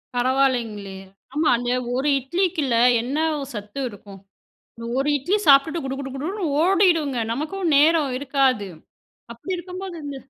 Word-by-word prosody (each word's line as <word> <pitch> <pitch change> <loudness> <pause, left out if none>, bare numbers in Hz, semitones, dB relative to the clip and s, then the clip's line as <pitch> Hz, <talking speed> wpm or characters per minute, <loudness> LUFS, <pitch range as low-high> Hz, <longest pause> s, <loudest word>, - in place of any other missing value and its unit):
பரவாயில்லேங்களே! 245 -6 0 0.4
ஆமா 305 +2 +1
அந்த 245 0 -3 0.3
ஒரு 265 +3 -1
இட்லிக்கில்ல 310 -2 -1 0.3
என்ன 260 +5 -3 0.4
சத்து 210 +5 -7
இருக்கும்? 200 -1 -13 0.8
ஒரு 275 - 0
இட்லி 305 +9 0
சாப்பிட்டுட்டு 285 +4 +5
குடு, 270 0 -3
குடு, 270 -1 -5
குடுன்னு 360 +9 -4 0.2
ஓடிடுங்க. 345 -7 +2
நமக்கும் 320 +6 -2
நேரம் 305 -1 +4
இருக்காது. 265 -6 +1 0.6
அப்பிடி 365 +11 -5
இருக்கும்போது 365 +1 -7
அந்த 285 -1 -6
275 Hz, 120 wpm, -22 LUFS, 250-335 Hz, 0.8 s, சாப்பிட்டுட்டு